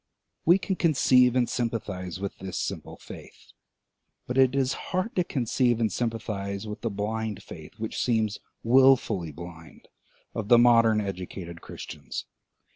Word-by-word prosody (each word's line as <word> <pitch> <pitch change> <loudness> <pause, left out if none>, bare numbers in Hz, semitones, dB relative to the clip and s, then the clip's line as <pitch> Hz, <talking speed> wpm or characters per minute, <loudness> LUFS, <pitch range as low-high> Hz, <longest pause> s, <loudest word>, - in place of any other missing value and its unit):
We 175 +3 +7
can 195 -1 -3
conceive 130 -6 +4
and 125 -2 +3
sympathise 100 -7 -3
with 100 0 -5
this 95 -1 -5
simple - - -4
faith; - - -13 0.7
but 125 - -4
it 130 0 +4
is 135 -1 +2 0.2
hard 195 +7 -1
to 180 - +3
conceive 120 -4 +1
and 110 -3 +1
sympathise 105 -3 -3
with 105 0 -7
the 115 - -1
blind 105 0 -3
faith, 80 -2 -11
which 110 0 -3
seems 110 -4 +1 0.2
wilfully 115 -8 +4
blind, 80 +1 -11 0.4
of 110 -3 -4
the 120 +1 +7
modem 115 -2 +5
educated 90 -3 -6
Christians. - - -7
110 Hz, 140 wpm, -27 LUFS, 100-125 Hz, 0.7 s, We